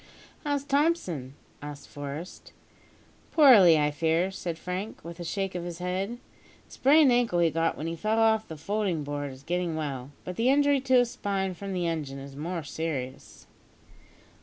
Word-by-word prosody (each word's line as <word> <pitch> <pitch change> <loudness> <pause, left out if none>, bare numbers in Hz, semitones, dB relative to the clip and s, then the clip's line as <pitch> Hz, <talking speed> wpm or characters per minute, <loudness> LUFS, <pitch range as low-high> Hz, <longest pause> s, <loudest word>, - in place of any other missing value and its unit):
"How's 285 -2 -1
Thompson?" 280 - 0 0.3
asked 145 -1 -8
Forest. 145 +5 -8 0.8
"Poorly, 215 - +8
I 150 0 +2
fear," 165 +5 +1
said 175 -3 -5
Frank, 180 +5 -5
with 170 +1 -8
a - - -4
shake 195 +3 -2
of 175 -1 -4
his 175 -1 -6
head. 185 +6 -3 0.5
"The - - -27
sprained 285 0 +5
ankle 240 -7 +2
he 170 -2 +3
got 165 +1 0
when 155 - -5
he 165 0 -3
fell 215 +6 0
off 220 -1 +3
the 160 - -8
folding 195 -1 -1
board 145 -1 -4
is 130 +1 -13
getting 175 0 -1
well, 140 -4 -4
but 180 - -6
the 235 +3 +3
injury 285 0 +4
to 260 -1 +2
his 245 -1 +4
spine 195 -2 -2
from 195 +2 -7
the 180 -2 -1
engine 155 -5 -3
is 135 0 -9
more 165 +3 -4
serious." 140 -4 -5
175 Hz, 175 wpm, -28 LUFS, 155-220 Hz, 0.8 s, Poorly